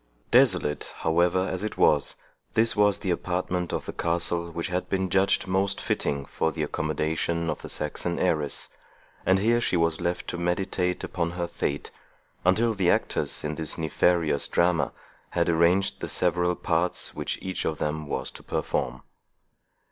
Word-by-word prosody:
Desolate, 75 Hz, 0 st, +3 dB
however, 85 Hz, +3 st, +3 dB
as 95 Hz, -, -3 dB
it 110 Hz, -, -4 dB
was, 75 Hz, -3 st, +3 dB, 0.4 s
this 115 Hz, +1 st, +3 dB
was 105 Hz, -1 st, +4 dB
the 95 Hz, -, -2 dB
apartment 90 Hz, 0 st, -1 dB
of -, -, -3 dB
the -, -, -5 dB
castle 85 Hz, 0 st, 0 dB
which 85 Hz, 0 st, -4 dB
had 90 Hz, +1 st, -2 dB
been 95 Hz, -2 st, 0 dB
judged 95 Hz, +2 st, +3 dB
most 95 Hz, +1 st, +1 dB
fitting 70 Hz, -1 st, -1 dB
for 80 Hz, -, -1 dB
the 75 Hz, 0 st, -3 dB
accommodation 80 Hz, +2 st, -1 dB
of -, -, -6 dB
the -, -, -7 dB
Saxon 80 Hz, +3 st, -2 dB
heiress; 75 Hz, -5 st, -1 dB, 0.6 s
and 95 Hz, -, +5 dB
here 115 Hz, +4 st, +2 dB
she 95 Hz, -, +1 dB
was 85 Hz, 0 st, +1 dB
left 85 Hz, 0 st, -2 dB
to 90 Hz, -, -3 dB
meditate 90 Hz, +1 st, -1 dB
upon 85 Hz, -1 st, -1 dB
her 90 Hz, -1 st, -2 dB
fate, 70 Hz, -3 st, -3 dB, 0.5 s
until 110 Hz, +6 st, +3 dB
the 95 Hz, -4 st, +1 dB
actors -, -, +1 dB
in 75 Hz, 0 st, -2 dB
this 80 Hz, -1 st, -2 dB
nefarious 80 Hz, -2 st, +2 dB
drama 85 Hz, -2 st, +2 dB, 0.4 s
had 85 Hz, -1 st, 0 dB
arranged 85 Hz, +4 st, +3 dB
the -, -, -4 dB
several 90 Hz, 0 st, +1 dB
parts 85 Hz, +2 st, 0 dB
which -, -, -3 dB
each 95 Hz, 0 st, -3 dB
of 80 Hz, -, -1 dB
them 75 Hz, +1 st, -2 dB
was -, -, -3 dB
to -, -, -11 dB
perform. -, -, -2 dB
85 Hz, 165 wpm, -26 LUFS, 80-95 Hz, 0.6 s, and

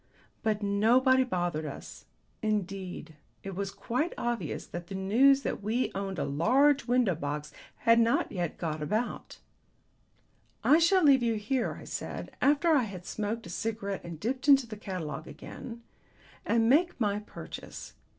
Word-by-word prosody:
But 215 Hz, -1 st, 0 dB
nobody 245 Hz, +6 st, +4 dB
bothered 175 Hz, -9 st, -2 dB
us. 140 Hz, -, -9 dB, 0.4 s
Indeed 190 Hz, -6 st, -3 dB, 0.3 s
it 195 Hz, -, -5 dB
was 195 Hz, +1 st, -3 dB
quite 235 Hz, -, -2 dB
obvious 240 Hz, -1 st, -3 dB
that 175 Hz, 0 st, -7 dB
the 195 Hz, -, -6 dB
news 255 Hz, +9 st, +4 dB
that -, -, -3 dB
we 225 Hz, +5 st, 0 dB
owned 195 Hz, -1 st, -4 dB
a -, -, 0 dB
large 265 Hz, -, +3 dB
window 245 Hz, -5 st, +3 dB
box 150 Hz, -1 st, -4 dB, 0.3 s
had 230 Hz, 0 st, +6 dB
not 230 Hz, 0 st, +2 dB
yet 175 Hz, -4 st, -3 dB
got 155 Hz, -2 st, -3 dB
about. 215 Hz, +10 st, -2 dB, 1.3 s
"I 310 Hz, -, +6 dB
shall 360 Hz, +2 st, +4 dB
leave 275 Hz, -3 st, +6 dB
you 230 Hz, -2 st, +1 dB
here," 230 Hz, +4 st, -1 dB
I -, -, -11 dB
said, -, -, -6 dB
after 295 Hz, +4 st, +3 dB
I 290 Hz, -7 st, +4 dB
had 185 Hz, -4 st, -8 dB
smoked 215 Hz, +4 st, -3 dB
a 170 Hz, -, -8 dB
cigarette 200 Hz, -1 st, -3 dB
and 170 Hz, -2 st, -8 dB
dipped 255 Hz, -, -3 dB
into 275 Hz, -3 st, +7 dB
the 220 Hz, -2 st, -8 dB
catalogue 165 Hz, -7 st, -5 dB
again, 235 Hz, -2 st, -9 dB, 0.6 s
"and 225 Hz, 0 st, +3 dB
make 320 Hz, +6 st, +3 dB
my 205 Hz, -2 st, +1 dB
purchase. 210 Hz, -, -9 dB
215 Hz, 155 wpm, -29 LUFS, 185-255 Hz, 1.3 s, into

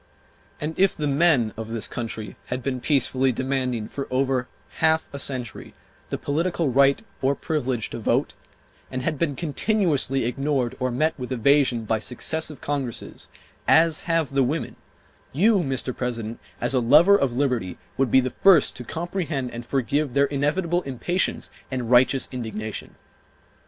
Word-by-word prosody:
And 150 Hz, +2 st, -3 dB
if 195 Hz, 0 st, +3 dB
the 150 Hz, -, -2 dB
men 140 Hz, -6 st, +3 dB
of 110 Hz, 0 st, -6 dB
this 115 Hz, -1 st, -2 dB
country 110 Hz, -3 st, -5 dB
had 125 Hz, 0 st, -4 dB
been 130 Hz, -2 st, -2 dB
peacefully 135 Hz, -2 st, +2 dB
demanding 130 Hz, -3 st, -2 dB
for 140 Hz, -, -5 dB
over 130 Hz, -1 st, 0 dB, 0.3 s
half 160 Hz, 0 st, +3 dB
a 140 Hz, -, -5 dB
century 125 Hz, -4 st, -5 dB, 0.3 s
the -, -, -2 dB
political 165 Hz, +1 st, 0 dB
right 135 Hz, +2 st, +4 dB, 0.2 s
or 135 Hz, +1 st, +2 dB
privilege 130 Hz, -9 st, -2 dB
to -, -, -5 dB
vote, -, -, 0 dB, 0.6 s
and 130 Hz, -1 st, -4 dB
had 155 Hz, -4 st, -1 dB
been 150 Hz, -4 st, 0 dB
continuously 155 Hz, -, 0 dB
ignored 135 Hz, 0 st, -1 dB
or 130 Hz, -, 0 dB
met 155 Hz, +6 st, +1 dB
with 125 Hz, 0 st, -6 dB
evasion 130 Hz, -2 st, +3 dB
by 110 Hz, +1 st, 0 dB
successive 150 Hz, +6 st, -2 dB
Congresses, 140 Hz, -5 st, -4 dB, 0.4 s
as 165 Hz, -1 st, +5 dB
have 165 Hz, -4 st, +1 dB
the 135 Hz, 0 st, +2 dB
women, 145 Hz, +5 st, -1 dB, 0.6 s
you, 205 Hz, -, +4 dB
Mr. 135 Hz, -5 st, -2 dB
President, 115 Hz, -2 st, -4 dB, 0.2 s
as 120 Hz, +3 st, +1 dB
a 130 Hz, -, +3 dB
lover 150 Hz, +11 st, +6 dB
of 140 Hz, -10 st, +1 dB
liberty, 125 Hz, -9 st, -1 dB, 0.2 s
would 135 Hz, -2 st, +1 dB
be 130 Hz, -, +5 dB
the 130 Hz, 0 st, -3 dB
first 185 Hz, -7 st, +4 dB
to 125 Hz, -, -6 dB
comprehend 160 Hz, -3 st, -3 dB
and 120 Hz, 0 st, -8 dB
forgive 140 Hz, +1 st, 0 dB
their 140 Hz, 0 st, +5 dB
inevitable 155 Hz, +5 st, 0 dB
impatience 175 Hz, +6 st, -2 dB, 0.2 s
and 125 Hz, -3 st, -3 dB
righteous 130 Hz, +1 st, +4 dB
indignation. 110 Hz, -4 st, -6 dB
135 Hz, 155 wpm, -24 LUFS, 125-155 Hz, 0.6 s, lover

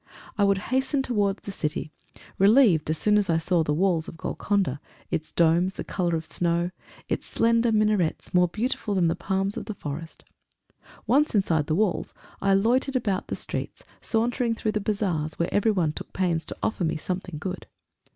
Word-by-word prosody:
I 205 Hz, -, +2 dB
would 200 Hz, -1 st, +4 dB, 0.2 s
hasten 265 Hz, +1 st, +1 dB
towards 205 Hz, -6 st, 0 dB
the 200 Hz, -, -5 dB
city, 155 Hz, -4 st, -3 dB, 0.5 s
relieved 200 Hz, -, +5 dB
as 155 Hz, -, 0 dB
soon 210 Hz, +4 st, +3 dB
as 200 Hz, -3 st, -1 dB
I 165 Hz, -, +3 dB
saw 170 Hz, +1 st, +1 dB
the 150 Hz, -, -1 dB
walls 170 Hz, 0 st, +1 dB
of 165 Hz, -, -9 dB
Golconda 190 Hz, -7 st, -1 dB, 0.3 s
its 155 Hz, -, -2 dB
domes, 170 Hz, +3 st, +3 dB
the -, -, -5 dB
colour 175 Hz, -3 st, -1 dB
of 160 Hz, 0 st, -3 dB
snow 170 Hz, +1 st, 0 dB, 0.4 s
its -, -, -2 dB
slender 230 Hz, 0 st, +2 dB
minarets, 210 Hz, -6 st, +1 dB
more 180 Hz, 0 st, +5 dB
beautiful 215 Hz, +1 st, -2 dB
than 175 Hz, -3 st, +3 dB
the 165 Hz, -, 0 dB
palms 195 Hz, +2 st, -1 dB
of -, -, -5 dB
the 215 Hz, -1 st, -5 dB
forest! 160 Hz, 0 st, -7 dB, 0.8 s
Once 285 Hz, 0 st, +3 dB
inside 165 Hz, -7 st, +2 dB
the 155 Hz, -, +1 dB
walls, 205 Hz, 0 st, 0 dB, 0.3 s
I 195 Hz, -1 st, +3 dB
loitered 250 Hz, +7 st, +2 dB
about 205 Hz, -6 st, 0 dB
the -, -, -3 dB
streets, -, -, -5 dB, 0.2 s
sauntering 235 Hz, +1 st, 0 dB
through 220 Hz, -1 st, -1 dB
the 215 Hz, -, -1 dB
bazaars, 185 Hz, -7 st, -1 dB
where 170 Hz, -, -1 dB
everyone 195 Hz, -7 st, +2 dB
took -, -, -8 dB
pains 175 Hz, -3 st, 0 dB
to -, -, -6 dB
offer 220 Hz, -, 0 dB
me 160 Hz, -, 0 dB
something 180 Hz, 0 st, -4 dB
good. 180 Hz, +4 st, -5 dB
190 Hz, 180 wpm, -26 LUFS, 165-215 Hz, 0.8 s, relieved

